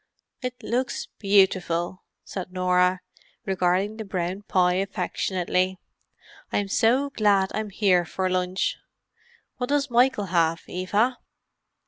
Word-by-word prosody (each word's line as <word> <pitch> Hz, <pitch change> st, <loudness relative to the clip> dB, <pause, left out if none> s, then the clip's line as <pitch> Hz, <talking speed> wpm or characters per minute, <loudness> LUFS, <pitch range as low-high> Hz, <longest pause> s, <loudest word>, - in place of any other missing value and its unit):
"It 250 Hz, -1 st, -3 dB
looks 255 Hz, +2 st, -2 dB
beautiful," 185 Hz, -3 st, +2 dB, 0.2 s
said 185 Hz, -2 st, -6 dB
Norah, 180 Hz, 0 st, +2 dB, 0.4 s
regarding 190 Hz, +2 st, +1 dB
the 220 Hz, -, -4 dB
brown 185 Hz, -1 st, -3 dB
pie 180 Hz, -3 st, +2 dB
affectionately. 185 Hz, -1 st, -1 dB, 0.7 s
"I'm 200 Hz, -1 st, -1 dB
so 255 Hz, +8 st, +2 dB
glad 200 Hz, -5 st, +2 dB
I'm 215 Hz, -1 st, -2 dB
here 190 Hz, -3 st, +3 dB
for 185 Hz, +2 st, -2 dB
lunch. 185 Hz, 0 st, 0 dB, 0.8 s
What 250 Hz, -1 st, -3 dB
does 285 Hz, -2 st, +1 dB
Michael 240 Hz, -3 st, +3 dB
have, 165 Hz, -1 st, +2 dB
Eva?" 210 Hz, +7 st, 0 dB
190 Hz, 110 wpm, -25 LUFS, 180-215 Hz, 0.8 s, here